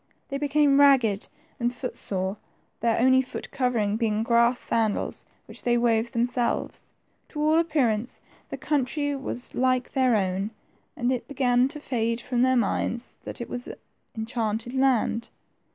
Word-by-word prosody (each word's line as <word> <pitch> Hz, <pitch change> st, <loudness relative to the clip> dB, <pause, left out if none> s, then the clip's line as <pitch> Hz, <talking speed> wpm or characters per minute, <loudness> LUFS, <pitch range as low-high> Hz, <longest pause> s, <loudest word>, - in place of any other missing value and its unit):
They 275 Hz, -, -3 dB
became 290 Hz, -1 st, +3 dB
ragged 250 Hz, -8 st, +4 dB, 0.3 s
and 240 Hz, 0 st, +1 dB
foot 250 Hz, 0 st, -5 dB
sore, 190 Hz, +1 st, -2 dB, 0.4 s
their 230 Hz, 0 st, +1 dB
only 260 Hz, +2 st, +5 dB
foot 255 Hz, -, -8 dB
covering 230 Hz, -5 st, 0 dB
being 220 Hz, -1 st, 0 dB
grass 235 Hz, +1 st, +3 dB
sandals, 220 Hz, -2 st, -1 dB, 0.2 s
which -, -, -11 dB
they 240 Hz, -1 st, +2 dB
wove 235 Hz, -1 st, +1 dB
themselves. 240 Hz, 0 st, -1 dB, 0.4 s
To 300 Hz, -, -7 dB
all 310 Hz, +2 st, +4 dB
appearance 250 Hz, -9 st, 0 dB, 0.3 s
the -, -, -5 dB
country 285 Hz, 0 st, -1 dB
was 265 Hz, -2 st, -5 dB
like 255 Hz, 0 st, +1 dB
their 255 Hz, -3 st, +3 dB
own, 195 Hz, 0 st, 0 dB, 0.5 s
and 245 Hz, +1 st, +1 dB
it 255 Hz, -, -2 dB
began 250 Hz, -2 st, +2 dB
to 300 Hz, +2 st, -7 dB
fade 230 Hz, -4 st, -1 dB
from 245 Hz, 0 st, -1 dB
their 260 Hz, 0 st, +4 dB
minds 235 Hz, +2 st, -1 dB
that -, -, -6 dB
it 235 Hz, -, -4 dB
was 245 Hz, 0 st, -5 dB, 0.5 s
enchanted 225 Hz, +1 st, -2 dB
land. 255 Hz, -3 st, +1 dB
245 Hz, 150 wpm, -26 LUFS, 225-260 Hz, 0.5 s, only